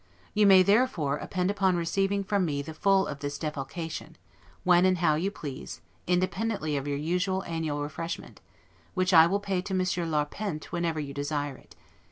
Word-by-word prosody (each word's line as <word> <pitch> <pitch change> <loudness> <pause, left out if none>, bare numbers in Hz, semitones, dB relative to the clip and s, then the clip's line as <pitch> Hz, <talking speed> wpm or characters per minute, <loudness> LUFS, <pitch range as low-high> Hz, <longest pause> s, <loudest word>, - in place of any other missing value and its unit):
You 210 -1 +4
may, 190 -1 +8
therefore, 200 - +2
depend 185 +1 -1
upon 190 -2 +2
receiving 195 +4 0
from 200 0 +1
me 145 -4 -1
the 160 - -7
full 195 +4 +3
of 145 -1 -6
this 145 0 -4
defalcation, 155 +2 -5 0.5
when 180 -1 +5
and 185 -1 +3
how 165 -3 +3
you 170 +6 0
please, 145 -9 -7 0.3
independently 180 -2 0
of 140 0 -2
your 140 -1 -1
usual 180 +5 0
annual 160 -4 -2
refreshment, 155 +3 -6 0.5
which 185 0 +1
I 165 -1 +9
will 200 +4 +1
pay 195 -3 -1
to 190 0 -4
Monsieur 185 -2 0
Larpent, 155 +2 -2
whenever 170 -3 -1
you 140 -2 -5
desire 145 0 -2
it. - - -18
170 Hz, 175 wpm, -28 LUFS, 150-190 Hz, 0.5 s, I